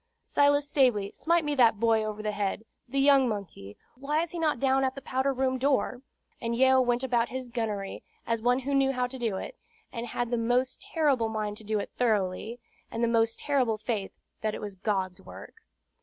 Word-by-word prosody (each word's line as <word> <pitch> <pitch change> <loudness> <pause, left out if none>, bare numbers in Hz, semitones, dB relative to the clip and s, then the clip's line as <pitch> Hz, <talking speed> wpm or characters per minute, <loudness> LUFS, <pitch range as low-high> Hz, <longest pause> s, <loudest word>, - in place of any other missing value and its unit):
Silas 285 0 +3
Stavely, 245 -9 +2
smite 335 -1 +1
me 295 - 0
that 230 -6 +4
boy 225 -1 +3
over 215 0 -4
the 210 - -1
head, 205 +1 -2 0.2
the 275 - -3
young 275 -2 +5
monkey; 180 - -6 0.2
why 295 +5 -1
is 340 - -6
he 345 - -5
not 310 -6 +1
down 270 +1 +2
at 260 0 0
the 275 - -7
powder 265 +2 0
room 260 0 0
door?" 265 -2 +1 0.4
And 235 -1 -1
Yeo 260 +1 +5
went 245 0 +1
about 240 -2 +1
his 255 -1 -6
gunnery, 215 -5 -3 0.2
as 230 -1 -1
one 245 +3 +2
who 280 +2 -2
knew 270 -1 +3
how 250 -1 0
to 255 +1 -7
do 225 -5 -1
it, - - -7 0.3
and 235 -1 -4
had 240 0 -3
the 240 - +1
most 250 - 0
terrible 300 - +1
mind 210 -1 -3
to 220 - -10
do 215 0 -1
it 200 - -4
thoroughly, 220 0 0 0.3
and 230 - -3
the - - +4
most 230 -1 +2
terrible 255 -6 +1
faith 215 -2 -3 0.3
that 215 -1 -1
it - - -6
was 205 -1 -6
God's 190 -2 -2
work. - - -11
245 Hz, 210 wpm, -28 LUFS, 215-270 Hz, 0.4 s, young